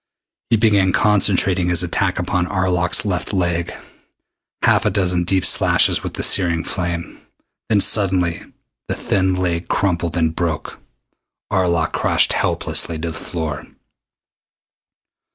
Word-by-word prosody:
He 115 - +3
began 100 -4 +2
concentrating 95 -3 +2
his 90 0 +2
attack 90 +2 -1
upon 90 0 -1
Arlok's 90 -1 0
left 95 0 -3
leg. 85 -2 -1 0.9
Half - - +3
a - - +2
dozen 90 -3 0
deep 95 +1 +1
slashes - - +3
with - - -6
the - - -3
searing 85 -3 +3
flame 85 -2 -4 0.5
then 105 -3 +3
suddenly 90 -6 +1 0.5
the - - -3
thin 95 -1 0
leg 90 -2 -2
crumpled 85 -4 -1
and 80 -1 0
broke. 80 -4 -4 0.7
Arlok 85 -3 +1
crashed - - +1
helplessly 85 - -1
to 80 +1 -4
the - - -8
floor. 75 -5 -5
90 Hz, 125 wpm, -19 LUFS, 85-95 Hz, 0.9 s, He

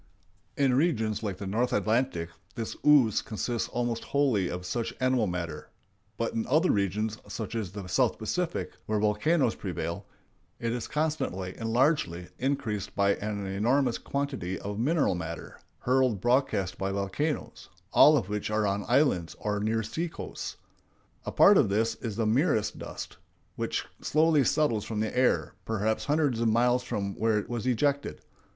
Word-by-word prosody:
In 135 -3 +3
regions 115 - +1
like 100 -4 -3
the 100 - -6
North 115 +6 0
Atlantic 110 -5 0 0.3
this 115 -3 -4
ooze 135 -8 +5
consists 115 +2 -3
almost 120 -1 -2
wholly 125 -11 +1
of 90 0 -5
such 115 +5 -3
animal 130 -4 +2
matter; 90 -2 -4 0.5
but 115 - -1
in 115 - -2
other 155 +8 +3
regions, 105 +2 0
such 110 0 -5
as 110 -6 -3
the 100 -1 -7
South 110 +7 +1
Pacific, 170 - -2 0.2
where 110 - +1
volcanoes 110 +7 +2
prevail, 85 -3 -4 0.5
it 115 0 -2
is 120 -2 -3
constantly 150 - -2
and 115 -1 -4
largely 115 - +1
increased 110 -7 -2
by 100 0 +3
an 105 -1 -3
enormous 115 +7 +1
quantity 135 -10 -3
of 100 +1 -5
mineral 150 - +2
matter 85 -2 -6 0.2
hurled 130 -4 +2
broadcast 120 -5 +1
by 95 0 -1
volcanoes, 100 +11 -3 0.2
all - - +8
of - - -1
which 105 0 -3
are 105 0 +1
on 100 0 0
islands 120 - +2
or 105 -1 -2
near 110 +2 0
sea 165 +10 -3
coasts. - - -7 0.7
A - - -1
part 200 0 +7
of 115 - +3
this 110 +3 +1
is 110 -3 -4
the 115 0 0
merest 115 0 +1
dust, - - -7 0.4
which - - -2 0.2
slowly 155 -1 +3
settles 125 -6 +1
from 110 0 -4
the 110 +2 -2
air, 125 0 +2
perhaps 110 0 -1
hundreds 145 -5 +1
of 115 - +2
miles 120 +2 +3
from 100 -5 -3
where 110 -1 +2
it 105 - -2
was 120 0 -3
ejected. 140 +3 0
115 Hz, 160 wpm, -28 LUFS, 100-130 Hz, 0.7 s, all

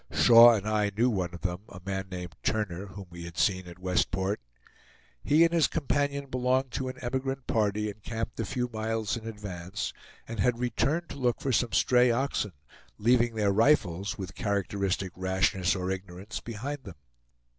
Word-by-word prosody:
Shaw 120 0 +8
and 105 -1 -3
I 105 -1 +2
knew 120 +2 +3
one 90 -5 -1
of 85 - -9
them; 90 -1 -2
a 95 - -10
man 95 -1 -3
named 90 -2 -6
Turner, 100 -3 -1
whom 100 +1 -9
we 85 0 -8
had 85 -1 -10
seen 95 -3 +1
at 85 0 -10
Westport. 95 +2 0 0.8
He 155 +3 +5
and 170 0 +3
his 165 -2 +4
companion 140 -2 -1
belonged 130 0 0
to 130 +2 -3
an 130 0 -6
emigrant 130 +1 -2
party 105 -1 +1
encamped 110 +3 -5
a 115 - 0
few 125 +3 -2
miles 110 -1 -2
in 115 -1 -7
advance, 100 -3 -5 0.3
and 115 -2 -6
had 120 +4 +2
returned 145 +7 0
to 140 - -7
look 125 -2 +1
for 135 - -1
some 120 -1 +1
stray 125 0 +4
oxen, 120 -5 0 0.4
leaving 120 +1 +3
their 105 -2 +2
rifles, 100 - +2
with 90 -3 -6
characteristic 100 -1 -1
rashness 95 0 +1
or 95 0 -2
ignorance 95 +2 -6
behind 130 +5 -5
them. 95 - -10
105 Hz, 175 wpm, -28 LUFS, 95-125 Hz, 0.8 s, Shaw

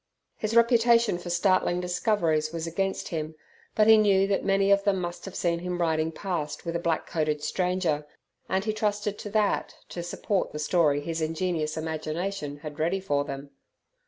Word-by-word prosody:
His 215 +1 -3
reputation 235 -3 +4
for 175 - -7
startling 175 0 +2
discoveries 175 -4 0
was 165 -1 -4
against 195 +4 -2
him, 155 -1 -4 0.4
but 215 - +5
he 220 0 +8
knew 195 -2 +4
that 195 0 0
many 195 0 +2
of 200 0 +4
them 200 -2 +2
must 175 -1 -5
have 195 - -8
seen 170 -1 0
him 180 0 -4
riding 160 -1 +1
past 165 -4 -4
with 170 0 -3
a - - +1
black 170 -1 -1
coated 150 -2 -1
stranger, 180 -3 0 0.4
and 190 +2 0
he 215 - 0
trusted 210 -1 -1
to 210 - -6
that 210 -1 0
to 175 - -5
support 180 +3 -2
the - - -4
story 150 -2 +2
his 165 +2 -3
ingenious 160 -1 -1
imagination 160 0 -3
had 150 0 -7
ready 170 +5 +1
for 145 -7 0
them. 140 0 -7
175 Hz, 180 wpm, -27 LUFS, 155-195 Hz, 0.4 s, he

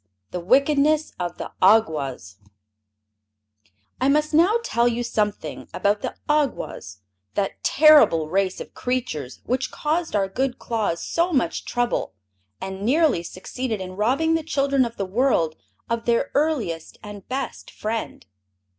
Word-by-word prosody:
The 180 - -3
Wickedness 280 - +3
of 175 -1 -3
the - - -6
Awgwas 150 - +2 1.6
I 265 - +3
must 300 +2 +2
now 345 +8 +5
tell 235 - +2
you 240 0 0
something 210 -3 -2
about 205 +1 +1
the - - -4
Awgwas, 275 - -1 0.3
that 195 -1 -2
terrible 295 - +6
race 190 +2 0
of - - -9
creatures 235 - -3
which 255 +1 -1
caused 315 -2 -2
our 195 -2 +2
good 250 +5 -2
Claus 215 -7 -2
so 340 +2 0
much 250 - 0
trouble 245 - -1 0.4
and 190 0 -6
nearly 275 - +3
succeeded 220 +6 -5
in 185 0 -7
robbing 265 +11 +2
the 325 - +1
children 275 -4 +1
of 235 0 -7
the 195 - -1
world 185 -6 +1 0.3
of 230 0 -2
their 235 +4 +1
earliest 260 - -1
and 205 -2 -10
best 260 -1 -4
friend. 220 - -4
235 Hz, 135 wpm, -23 LUFS, 190-280 Hz, 1.6 s, terrible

